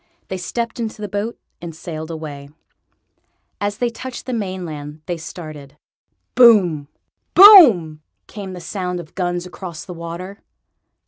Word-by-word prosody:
They 190 Hz, -, -3 dB
stepped 230 Hz, +6 st, -4 dB
into 220 Hz, -2 st, -4 dB
the 210 Hz, -, -4 dB
boat 205 Hz, +4 st, -4 dB, 0.2 s
and 170 Hz, -2 st, -8 dB
sailed 160 Hz, -2 st, -7 dB
away. 150 Hz, -3 st, -7 dB, 1.1 s
As 205 Hz, 0 st, -2 dB
they 240 Hz, 0 st, -1 dB
touched 255 Hz, +2 st, -8 dB
the 255 Hz, -, -4 dB
mainland 165 Hz, -8 st, -5 dB
they 175 Hz, -, -3 dB
started. 155 Hz, -4 st, -10 dB, 0.6 s
Boom! 190 Hz, -, +5 dB, 0.5 s
boom!! 245 Hz, -, +8 dB, 0.2 s
came 195 Hz, -3 st, -8 dB
the 180 Hz, -, -8 dB
sound 180 Hz, 0 st, -4 dB
of 165 Hz, -2 st, -11 dB
guns 175 Hz, -1 st, -2 dB
across 180 Hz, -2 st, -8 dB
the 180 Hz, -, -8 dB
water. 170 Hz, +4 st, -8 dB
180 Hz, 135 wpm, -20 LUFS, 160-210 Hz, 1.1 s, boom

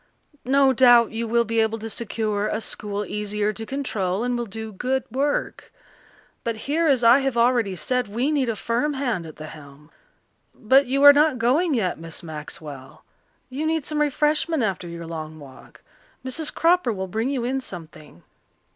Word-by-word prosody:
No 270 Hz, 0 st, +4 dB
doubt 245 Hz, -2 st, +6 dB
you 230 Hz, +1 st, -3 dB
will 235 Hz, +1 st, +2 dB
be 230 Hz, +1 st, 0 dB
able 220 Hz, 0 st, +1 dB
to 225 Hz, 0 st, -6 dB
secure 215 Hz, -1 st, -2 dB
a 215 Hz, -, -2 dB
school 210 Hz, -2 st, -4 dB
easier 210 Hz, 0 st, -2 dB
to 225 Hz, +1 st, -7 dB
control 220 Hz, -8 st, -2 dB
and 245 Hz, 0 st, -1 dB
will 240 Hz, -1 st, -3 dB
do 220 Hz, +2 st, -7 dB
good 255 Hz, +6 st, -1 dB
work. 280 Hz, +4 st, -2 dB, 0.7 s
But 230 Hz, -1 st, -2 dB
here, 320 Hz, +4 st, +1 dB
as 265 Hz, -5 st, +3 dB
I 235 Hz, +3 st, +7 dB
have 270 Hz, -3 st, -1 dB
already 235 Hz, -5 st, +2 dB
said, 250 Hz, +7 st, -1 dB
we 240 Hz, +8 st, -1 dB
need 275 Hz, -5 st, +1 dB
a 225 Hz, -, -1 dB
firm 240 Hz, +8 st, -1 dB
hand 240 Hz, -11 st, -2 dB
at 155 Hz, -, -11 dB
the 155 Hz, -, -9 dB
helm. 150 Hz, 0 st, -13 dB, 0.6 s
But 265 Hz, +4 st, +3 dB
you 275 Hz, +2 st, +1 dB
are 285 Hz, 0 st, +11 dB
not 295 Hz, -2 st, +3 dB
going 275 Hz, +7 st, +2 dB
yet, 185 Hz, -9 st, -1 dB
Miss 165 Hz, +1 st, -8 dB
Maxwell? 150 Hz, -3 st, -9 dB, 0.4 s
You 285 Hz, +5 st, -3 dB
need 320 Hz, -3 st, -1 dB
some 300 Hz, 0 st, -1 dB
refreshment 300 Hz, 0 st, +1 dB
after 190 Hz, -4 st, -2 dB
your 170 Hz, 0 st, -7 dB
long 160 Hz, -1 st, -7 dB
walk. 140 Hz, -3 st, -15 dB, 0.4 s
Mrs. 295 Hz, +4 st, -2 dB
Cropper 335 Hz, -6 st, +2 dB
will 190 Hz, -3 st, -3 dB
bring 220 Hz, +7 st, -2 dB
you 265 Hz, -4 st, -2 dB
in 265 Hz, +2 st, -1 dB
something." 155 Hz, -, -11 dB
230 Hz, 180 wpm, -23 LUFS, 195-270 Hz, 0.7 s, are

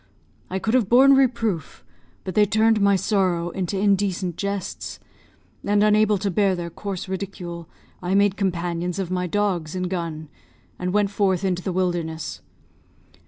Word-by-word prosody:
I 190 Hz, -, -2 dB
could 220 Hz, +4 st, -1 dB
have 240 Hz, -6 st, +2 dB
borne 265 Hz, +3 st, +7 dB
reproof, 230 Hz, -, 0 dB, 0.4 s
but 185 Hz, -, -5 dB
they 210 Hz, +2 st, +4 dB
turned 220 Hz, +1 st, +3 dB
my 200 Hz, 0 st, +4 dB
sorrow 185 Hz, -4 st, 0 dB
into 190 Hz, +1 st, -3 dB
indecent 195 Hz, -3 st, +1 dB
jests, 200 Hz, 0 st, -4 dB, 0.6 s
and, 205 Hz, 0 st, +2 dB
unable 215 Hz, 0 st, +4 dB
to 200 Hz, +1 st, -2 dB
bear 195 Hz, +1 st, +2 dB
their 170 Hz, -1 st, -5 dB
coarse 195 Hz, +1 st, -5 dB
ridicule, 180 Hz, -3 st, -6 dB, 0.3 s
I 185 Hz, +1 st, 0 dB
made 200 Hz, -1 st, +3 dB
companions 175 Hz, -2 st, -2 dB
of 185 Hz, -2 st, -3 dB
my 180 Hz, 0 st, -1 dB
dogs 185 Hz, -4 st, -1 dB
and 185 Hz, 0 st, -1 dB
gun, 165 Hz, -4 st, -4 dB, 0.5 s
and 180 Hz, 0 st, -2 dB
went 205 Hz, 0 st, +1 dB
forth 195 Hz, -3 st, +1 dB
into 180 Hz, -1 st, 0 dB
the 185 Hz, -, -3 dB
wilderness. 175 Hz, -3 st, -2 dB
190 Hz, 155 wpm, -23 LUFS, 175-205 Hz, 0.6 s, borne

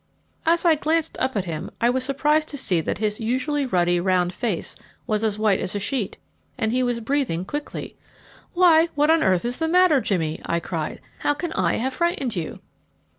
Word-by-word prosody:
As 340 Hz, +2 st, +3 dB
I 335 Hz, -, +6 dB
glanced 315 Hz, +1 st, 0 dB
up 260 Hz, -1 st, 0 dB
at 195 Hz, -, -1 dB
him, 160 Hz, -3 st, -4 dB
I 235 Hz, +1 st, +3 dB
was 260 Hz, 0 st, 0 dB
surprised 300 Hz, +3 st, +1 dB
to 285 Hz, -, -4 dB
see 185 Hz, -10 st, +1 dB
that -, -, -2 dB
his 210 Hz, -1 st, -1 dB
usually 260 Hz, +5 st, 0 dB
ruddy, 175 Hz, -4 st, +2 dB
round 180 Hz, 0 st, +1 dB
face 205 Hz, -3 st, -3 dB, 0.3 s
was 215 Hz, 0 st, 0 dB
as 215 Hz, -2 st, 0 dB
white 210 Hz, -3 st, +2 dB
as 185 Hz, -, -3 dB
a -, -, 0 dB
sheet, 210 Hz, 0 st, -3 dB, 0.4 s
and 220 Hz, -3 st, 0 dB
he 255 Hz, +2 st, +1 dB
was 245 Hz, -2 st, 0 dB
breathing 225 Hz, -, -1 dB
quickly. 295 Hz, +7 st, -5 dB, 0.6 s
"Why, 340 Hz, -2 st, +6 dB
what 295 Hz, +2 st, +3 dB
on 325 Hz, 0 st, +4 dB
earth 185 Hz, -, +2 dB
is 245 Hz, +1 st, -2 dB
the 320 Hz, -, 0 dB
matter, 345 Hz, -4 st, +4 dB
Jimmy?" 160 Hz, -8 st, -1 dB
I 170 Hz, -, 0 dB
cried; 165 Hz, -2 st, -4 dB, 0.2 s
"how 290 Hz, -, +1 dB
can 335 Hz, +2 st, -4 dB
I 175 Hz, -3 st, +1 dB
have 260 Hz, +3 st, -1 dB
frightened 280 Hz, -8 st, -1 dB
you?" 165 Hz, -3 st, -5 dB
245 Hz, 200 wpm, -23 LUFS, 185-295 Hz, 0.6 s, I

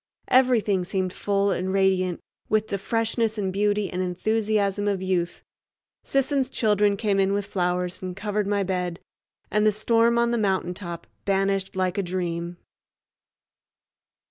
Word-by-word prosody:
Everything 235 Hz, -7 st, +3 dB
seemed 185 Hz, 0 st, -2 dB
full 200 Hz, 0 st, +1 dB
and 185 Hz, 0 st, -1 dB
radiant 190 Hz, -2 st, +2 dB, 0.3 s
with 215 Hz, 0 st, +1 dB
the 200 Hz, -, -2 dB
freshness 225 Hz, +1 st, 0 dB
and 190 Hz, -2 st, -1 dB
beauty 205 Hz, 0 st, +1 dB
and 180 Hz, 0 st, -3 dB
enthusiasm 205 Hz, +2 st, 0 dB
of 200 Hz, -2 st, +1 dB
youth. 180 Hz, -2 st, -2 dB, 0.6 s
Sisson's 275 Hz, -1 st, +1 dB
children 210 Hz, -4 st, +2 dB
came 200 Hz, -2 st, +1 dB
in 195 Hz, 0 st, +2 dB
with 200 Hz, 0 st, -1 dB
flowers 180 Hz, -2 st, -1 dB
and 185 Hz, -1 st, -5 dB
covered 205 Hz, +1 st, -2 dB
my 200 Hz, -1 st, +1 dB
bed, 180 Hz, -2 st, -2 dB, 0.5 s
and 210 Hz, +1 st, +2 dB
the 215 Hz, -, +5 dB
storm 230 Hz, +2 st, +2 dB
on 235 Hz, 0 st, +2 dB
the 235 Hz, -, +1 dB
mountaintop 180 Hz, -3 st, -2 dB, 0.2 s
banished 195 Hz, -1 st, 0 dB
like 185 Hz, 0 st, 0 dB
a -, -, +3 dB
dream. 175 Hz, -1 st, -3 dB
195 Hz, 145 wpm, -25 LUFS, 185-215 Hz, 0.6 s, the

